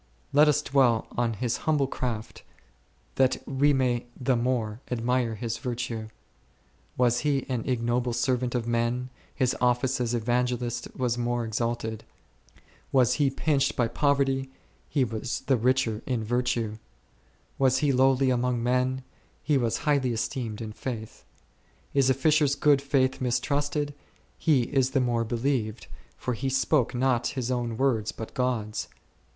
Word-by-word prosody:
Let 150 +2 +6
us 150 0 +3
dwell 130 -5 +3
on 120 -1 0
his 120 +3 -1
humble 150 -3 +3
craft, 120 -4 -4 0.8
that 130 -1 +3
we 140 +2 +3
may 125 -3 +1
the 130 0 +2
more 120 -2 -1
admire 125 -1 0
his 115 +1 -4
virtue; 120 -3 -4 0.9
was 120 -1 +3
he 145 -3 0
an 125 -1 -2
ignoble 120 0 0
servant 125 0 0
of 120 -2 -1
men, 120 +2 -1 0.2
his 130 -3 +1
office 125 +1 +2
as 120 0 0
Evangelist 120 +1 -1
was 120 -2 0
more 120 0 -1
exalted; 110 0 -2 0.9
was 125 -2 +4
he 140 - +4
pinched 135 0 +1
by 120 - +2
poverty, 135 +1 +1 0.4
he 140 -3 +2
was 115 0 -3
the 135 - +2
richer 120 -2 +1
in 125 -4 -1
virtue; 115 -2 -1 0.8
was 130 -1 +4
he 140 - +4
lowly 130 0 +3
among 125 -1 0
men, 125 +1 +1 0.4
he 150 - +2
was 115 -4 +1
highly 140 -5 +2
esteemed 115 -1 -3
in 110 -1 -6
faith. 110 -2 -6 0.7
Is 135 -2 +3
a 130 - +4
fisher's 150 0 +3
good 145 -1 +4
faith 135 -2 +1
mistrusted, 145 +4 0 0.5
he 145 -7 +3
is 130 +1 +1
the - - +5
more 120 -2 +1
believed, 115 -4 -1 0.3
for 125 - -2
he 135 +4 -2
spoke 130 -1 +1
not 125 -1 +1
his 130 -1 -1
own 120 -2 -2
words 115 -5 +1
but 110 - -8
God's. 120 -4 -1
125 Hz, 145 wpm, -27 LUFS, 120-135 Hz, 0.9 s, Let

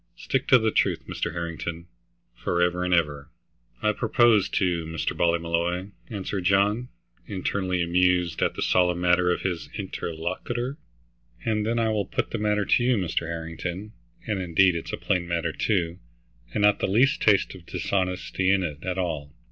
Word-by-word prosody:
Stick - - -2
to 130 - +8
the 110 -2 +1
truth, - - +1
Mr. - - -3
Harrington, 85 0 -4 0.5
forever 90 +1 0
and 90 - -1
ever." 75 -4 +1 0.5
"I 105 - +4
propose 115 -2 +3
to, 90 -3 0
Mr. 80 0 -2
Ballymolloy," 85 +2 0 0.2
answered 100 -2 -3
John, 100 +6 +2 0.4
internally 95 -2 -1
amused 90 -1 +2
at - - +1
the - - -2
solemn 90 -1 +2
manner 90 0 +3
of 90 - 0
his 90 -4 -3
interlocutor. 115 - -4 0.7
"And 110 -1 0
then 115 +1 0
I 115 -1 +2
will 105 -2 0
put - - -2
the 115 - -2
matter 105 -1 +1
to 120 - +3
you, 125 -1 +3
Mr. 85 -3 -1
Harrington, 85 +5 -5 0.3
and 105 -3 -1
indeed 90 +1 +4
it's 85 - -4
a - - -3
plain 90 -3 -1
matter, 85 -1 -1
too, 90 -2 -1 0.5
and 105 - -1
not 105 0 +5
the - - 0
least 125 +9 +3
taste 105 -3 +3
of 90 -3 -13
dishonesty 95 0 -1
in 95 -1 +3
it, 75 -4 -4
at 95 0 -2
all. 80 -6 -3
90 Hz, 165 wpm, -26 LUFS, 85-105 Hz, 0.7 s, to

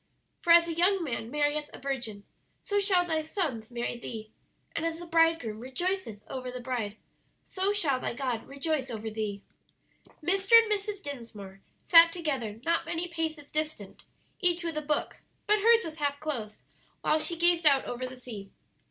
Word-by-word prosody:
"'For 345 - +2
as 335 0 +8
a 335 - -2
young 360 +3 +2
man 235 -6 -4
marrieth 295 +2 0
a - - -9
virgin, 240 -7 -4 0.4
so 410 0 +1
shall 380 -3 +3
thy 320 -2 0
sons 305 - -3
marry 240 0 -3
thee: 220 -2 -7 0.4
and 330 - -1
as 330 -1 -1
the 345 - -8
bridegroom 330 -10 +2
rejoiceth 260 - -3
over 255 -1 -5
the 250 0 -6
bride, 235 -4 -3 0.5
so 380 +1 0
shall 310 -11 +1
thy 235 - -3
God 250 -3 -3
rejoice 280 -1 -2
over 220 -1 -5
thee.'" 210 -2 -4 0.8
Mr. 390 +5 0
and 455 -2 +8
Mrs. 410 -1 -2
Dinsmore 220 -8 -8 0.2
sat 335 0 +9
together 270 -11 -3
not 335 0 +1
many 340 +1 -3
paces 320 -3 -4
distant, 305 -10 -3 0.4
each 350 -2 +2
with 335 -2 -3
a 305 - -1
book; 300 0 -2 0.2
but 420 +1 +3
hers 460 +2 +5
was 320 -1 -7
half 285 -2 -1
closed 240 -9 -4 0.4
while 310 - +2
she 340 +2 -2
gazed 345 -1 +4
out 275 -2 +5
over 250 +1 -4
the 255 0 -10
sea. 215 -6 -8
300 Hz, 175 wpm, -29 LUFS, 240-340 Hz, 0.8 s, sat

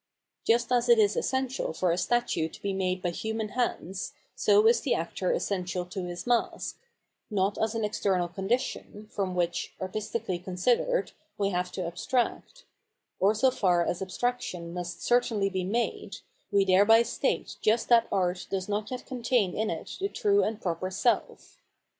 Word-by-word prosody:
Just 235 +2 +2
as 245 -1 +2
it 235 - +7
is 210 -1 +4
essential 260 -7 -1
for 180 +1 +1
'a 170 - 0
statue 240 -8 +1
to - - -13
be 200 -1 -1
made 185 -1 -1
by 175 - 0
human 220 +3 -3
hands, 195 -5 -2 0.2
so 415 +1 +4
is 460 +1 +5
the - - +1
actor - - -2
essential 185 - -2
to 180 +1 -5
his 175 0 -6
mask 240 -1 0 0.3
— - - -51
^not 200 0 0
as 220 +1 0
an 225 -1 0
external 190 -4 0
condition, 210 +2 -3
from 190 -3 -2
which, 175 -1 -1
artistically 200 0 -3
considered, 230 - 0 0.3
we 200 -1 +1
have 180 0 -1
to 185 - -3
abstract; 250 - -2 0.5
or 200 +3 +4
so 255 +5 +4
far 175 -6 +2
as 175 - -2
abstraction 185 -4 -3
must 175 0 -5
certainly 225 -5 +2
be 185 -1 -1
made, 230 +6 -2 0.4
we 200 -1 +4
thereby 205 +5 +6
state 235 - -2
just 225 +2 +2
that 235 -1 +6
art 180 -1 0
does 190 -1 -2
not 210 +1 -2
yet 255 -1 -5
contain 235 -6 0
in 220 0 0
it 165 - -5
the 395 +1 -1
true 405 -1 +2
and 220 0 -3
proper 180 +1 -2
self. 210 - -1
205 Hz, 170 wpm, -28 LUFS, 185-240 Hz, 0.5 s, it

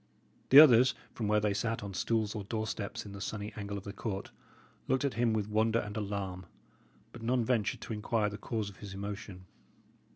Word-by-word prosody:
The 135 - +11
others, 130 -4 +8 0.2
from 110 - -3
where 105 0 +3
they 105 -1 +1
sat 115 +2 -2
on 100 -1 -6
stools 110 +2 0
or 105 -2 -4
doorsteps 110 -1 -4
in 100 - -8
the 100 0 -8
sunny 105 0 -4
angle 100 -1 -4
of 95 - -7
the 100 - -7
court, 100 -2 -4 0.6
looked 130 +2 +1
at 140 - 0
him 115 -1 +2
with 105 -2 0
wonder 110 +1 +2
and 105 -2 -3
alarm, 100 -4 -4 0.6
but 120 - -11
none 120 +1 +1
ventured 110 -4 0
to - - -5
inquire 105 0 0
the 105 - -7
cause 110 -4 -3
of 95 - -18
his 100 -2 -8
emotion. 100 -2 -6
105 Hz, 200 wpm, -32 LUFS, 100-115 Hz, 0.6 s, The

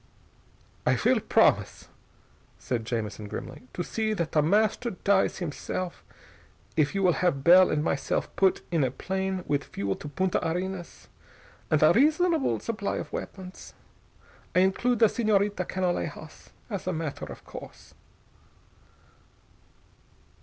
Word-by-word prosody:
"I - - +2
will - - +5
promise," - - +2 0.7
said 115 -3 -3
Jamison 110 -2 -3
grimly, 125 - -8
"to 175 - -2
see 220 +3 -1
that 170 -6 -2
The 150 - +3
Master 215 +8 +2
dies 200 -1 +1
himself 175 +1 -4 0.7
if 155 +5 +2
you 195 - +1
will 180 -2 +5
have 140 -7 +1
Bell 180 +3 +7
and 150 - 0
myself - - -1
put 190 -1 +2
in 165 -4 +2
a 130 - +2
plane 190 +6 -3
with 145 -1 0
fuel 100 -1 -3
to - - -8
Punta 185 +4 0
Arenas 180 +2 -4 0.6
and - - +3
a - - +7
reasonable 315 +1 +3
supply 215 -3 -3
of - - -6
weapons. 185 -1 -8 0.8
I 180 - +6
include 235 +6 +2
the 225 - +6
Señorita 205 -4 +1
Canalejas 185 -2 -3 0.2
as 200 -5 -5
a 185 - 0
matter 160 -3 -4
of - - -11
course." - - -11
185 Hz, 130 wpm, -27 LUFS, 160-200 Hz, 0.8 s, Bell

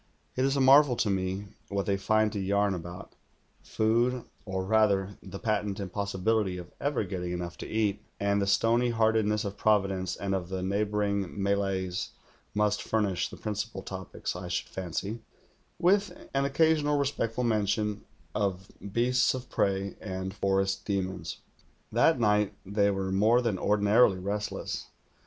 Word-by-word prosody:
It 130 - +1
is 135 +1 +2
a - - +2
marvel 135 0 +7
to 105 -3 +1
me 95 +1 -2 0.2
what 100 -1 -1
they 100 - +1
find 110 +2 +2
to 105 - -2
yarn 100 +1 +1
about: 90 0 -7 0.5
food, 120 +3 +1 0.2
or 95 -2 -3
rather 100 -2 +2
the 95 - -8
patent 105 -2 -1
impossi 100 -1 -4
bility 105 -4 +1
of 90 - -10
ever 145 -4 0
getting 90 -2 -4
enough 85 -1 -4
to - - -6
eat, 105 -2 0 0.2
and 100 0 +1
the 100 - 0
stony 115 +4 +3
heartedness 110 -2 +2
of 100 0 -5
Providence 95 -3 +1
and 95 +2 -2
of 90 -2 -2
the 95 -1 -3
neighbouring 100 -1 -1
Malays 95 -2 0 0.5
must 105 0 +2
furnish 105 -5 0
the - - -10
principal 105 -2 -4
topics, 95 -2 -5
I 90 0 -6
should - - -2
fancy, 95 +5 -4 0.6
with 200 +3 +1
an 135 0 +2
occasional 150 +1 +3
respectful 125 -4 -1
mention 105 -2 0 0.3
of 95 -2 -2 0.2
beasts 125 +4 +2
of 125 -1 -8
prey 100 0 0
and 95 -1 -4
forest 95 -1 0
demons. 95 -2 -3 0.5
That 160 -5 +4
night 105 -2 +2
they 100 +1 +2
were 95 -1 -1
more 110 +5 +4
than 115 -7 -1
ordinarily 105 +1 +4
restless. 100 +3 -3
100 Hz, 150 wpm, -29 LUFS, 95-110 Hz, 0.6 s, marvel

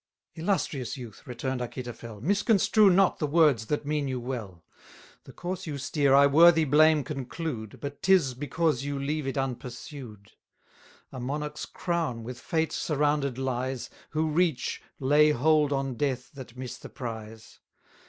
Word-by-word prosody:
Illustrious 160 - -2
youth! 120 -6 -10
returned 125 +1 -3
Achitophel, 120 -3 -7
Misconstrue 205 - +4
not 190 +1 +3
the 150 - 0
words 145 -8 +3
that 150 -1 -1
mean 150 -1 -1
you 130 -1 -2
well; 115 -9 -6 0.6
The - - -11
course 175 0 -5
you 145 -2 -3
steer 140 0 +2
I 140 +1 +7
worthy 160 +3 +6
blame 155 +1 +5
conclude, 135 -5 -5
But 140 0 -7
'tis 180 -9 +4
because 145 +3 -1
you 140 0 -3
leave 145 +1 -2
it 135 - -3
unpursued. 125 -4 -6 0.8
A 130 - -7
monarch's 150 +4 -4
crown 165 -10 -2
with 120 +1 -7
fate 160 +2 -1
surrounded 145 -3 0
lies, 130 -1 -3 0.2
Who 155 0 0
reach, 160 -5 0 0.2
lay 145 +3 +5
hold 150 +1 +3
on 135 -1 -1
death 130 -2 -2
that 130 -3 -11
miss 125 -2 -6
the - - -10
prize. 110 -4 -8
140 Hz, 145 wpm, -28 LUFS, 125-155 Hz, 0.8 s, I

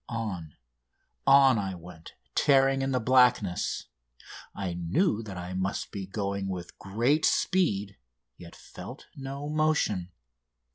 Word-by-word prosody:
On, 100 - -4 0.7
on 135 -4 +7
I 95 -2 -3
went 85 -1 -12 0.2
tearing 135 -1 +4
in 135 - 0
the 130 - +1
blackness. 125 -6 +2 0.7
I 95 -3 -3
knew 100 - +1
that 100 -4 -8
I 90 +1 -6
must 95 +1 -2
be 95 -2 -5
going 100 -1 -3
with 90 -2 -6
great 120 +10 +1
speed, 105 - +1 0.4
yet 85 +3 -12
felt - - -10
no 140 +1 -6
motion. 150 - 0
105 Hz, 125 wpm, -28 LUFS, 95-135 Hz, 0.7 s, on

